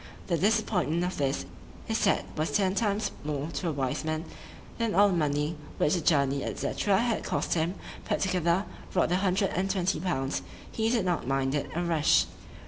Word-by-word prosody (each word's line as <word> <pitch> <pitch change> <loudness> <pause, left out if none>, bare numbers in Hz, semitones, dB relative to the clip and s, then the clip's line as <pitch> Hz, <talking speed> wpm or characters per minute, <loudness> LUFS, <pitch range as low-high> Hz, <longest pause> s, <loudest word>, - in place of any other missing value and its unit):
"The 175 - +1
disappointment 190 -6 +1
of 180 +1 -2
this, 140 -2 0 0.4
he - - -2
said, - - +2
was 155 +1 0
ten 190 -2 +2
times 210 0 0
more 150 0 -2
to 165 +3 -2
a - - 0
wise 135 -2 -2
man, 155 +1 -2 0.5
than 230 -2 0
all 205 +1 +6
the - - 0
money 150 0 0 0.2
which 150 - +2
the 175 - +1
journey, 140 -3 +2
&c. - - -2
had 220 +4 +2
cost - - -1
him, 170 +2 0 0.3
put - - 0
together,—rot 180 0 0
the 180 - +2
hundred 190 0 +1
and 190 +2 -1
twenty 190 -1 0
pounds,——he 175 +7 -2
did 230 -5 +1
not 175 -8 0
mind 135 0 +1
it 145 - -1
a 175 - 0
rush." 165 -3 +3
175 Hz, 180 wpm, -28 LUFS, 150-195 Hz, 0.5 s, all